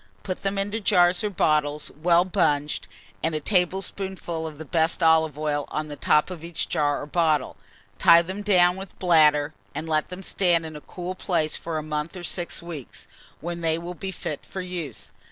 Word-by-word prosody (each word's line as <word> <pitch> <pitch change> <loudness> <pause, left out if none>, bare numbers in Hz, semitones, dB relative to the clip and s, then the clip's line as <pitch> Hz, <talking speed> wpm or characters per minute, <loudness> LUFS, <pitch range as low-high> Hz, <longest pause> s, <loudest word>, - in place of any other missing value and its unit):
Put 185 -2 -4
them 195 0 -1
into 205 +3 -1
jars 180 -2 +4
or 210 - +1
bottles 150 -5 +1
well 170 +3 +4
bunged, 150 -6 0 0.3
and 160 0 0
a - - 0
tablespoonful 180 -1 -1
of 155 -2 -9
the 160 - -8
best 160 +3 +1
olive 160 -2 +4
oil 150 -1 -1
on 155 0 -4
the 145 - -5
top 150 +4 +2
of 170 -3 -7
each 170 -1 -3
jar 145 -1 0
or - - -5
bottle. 155 -3 +1 0.4
Tie 170 0 +7
them 190 +4 -5
down 180 -3 +4
with 190 0 -9
bladder, 155 -4 +4 0.2
and 160 - -4
let 155 -1 +1
them 180 +1 -8
stand 175 -3 +2
in 155 -1 -7
a 150 - -8
cool 180 +3 -6
place 170 -4 -1
for 165 -1 -4
a 155 - -3
month 150 +3 -3
or 175 - -8
six 175 0 -2
weeks, 160 -7 -8 0.4
when 170 +1 -4
they 160 -1 +1
will 170 +1 -6
be 190 +2 -5
fit 155 -4 -5
for 190 - -7
use. 175 -8 -5
170 Hz, 195 wpm, -25 LUFS, 155-180 Hz, 0.4 s, Tie